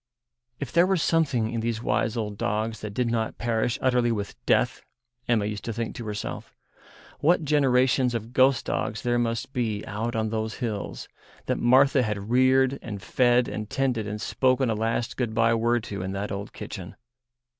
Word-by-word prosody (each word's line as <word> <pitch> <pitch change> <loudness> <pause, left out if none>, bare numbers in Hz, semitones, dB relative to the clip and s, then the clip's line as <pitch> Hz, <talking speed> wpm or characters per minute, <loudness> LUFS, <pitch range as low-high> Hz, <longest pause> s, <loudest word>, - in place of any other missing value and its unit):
If 140 -4 -5
there 170 +2 +4
were 190 0 +2
something 140 -9 +1
in 115 - -1
these 115 0 -2
wise 105 +2 0
old 105 -2 -3
dogs 110 +2 -2
that 110 - -5
did 125 -2 0
not 115 -1 -1
perish 120 0 0
utterly 125 -2 +3
with 100 -3 -3
death, - - +2 0.5
Emma 115 -4 +2
used 105 0 -4
to 115 - -3
think 115 0 -3
to 115 - -6
herself, 105 -1 -5 0.6
what 165 +1 +3
generations 130 -3 +3
of 115 +1 -5
ghost 130 0 +4
dogs 110 - -2
there 120 0 +1
must 115 +2 -2
be 110 -5 -2
out 115 +3 -3
on 110 -1 0
those 110 0 -2
hills, 110 -6 -4 0.4
that - - -1
Martha 130 +3 +5
had 105 -2 -3
reared 130 +1 +4
and 105 -4 -6
fed 120 +3 +2
and 110 0 -5
tended 125 -6 0
and 105 +1 -4
spoken 130 +2 +1
a - - +2
last 115 +2 -1
good 120 -4 -2
bye 115 0 +4
word 115 0 +1
to 100 -3 -5
in 95 +1 -3
that 100 +1 -3
old 100 0 -5
kitchen. - - -8
115 Hz, 185 wpm, -26 LUFS, 110-130 Hz, 0.6 s, Martha